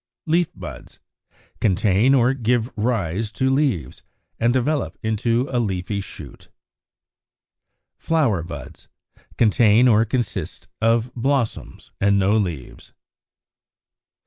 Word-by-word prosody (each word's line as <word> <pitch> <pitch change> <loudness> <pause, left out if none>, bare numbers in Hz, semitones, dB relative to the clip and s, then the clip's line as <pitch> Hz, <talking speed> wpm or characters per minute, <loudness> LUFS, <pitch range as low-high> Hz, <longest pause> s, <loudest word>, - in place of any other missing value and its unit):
Leaf 170 +1 +1
buds, - - -10 0.6
contain 105 +5 +3
or 125 0 +3
give 120 -1 -1
rise 105 -3 -1
to 130 +3 0
leaves, 135 - -1 0.4
and 120 +1 +3
develop 135 +4 -1
into 115 +3 0
a 125 - +1
leafy 100 -2 -2
shoot. 75 -7 -11 1.5
Flower 140 - +1
buds, 75 -5 -10 0.5
contain 115 +1 +4
or 110 -2 +5
consist 120 0 -3
of 115 +2 +1
blossoms, 130 -1 -2
and 100 0 +3
no 100 +2 +2
leaves. 85 - -4
115 Hz, 100 wpm, -22 LUFS, 100-125 Hz, 1.5 s, or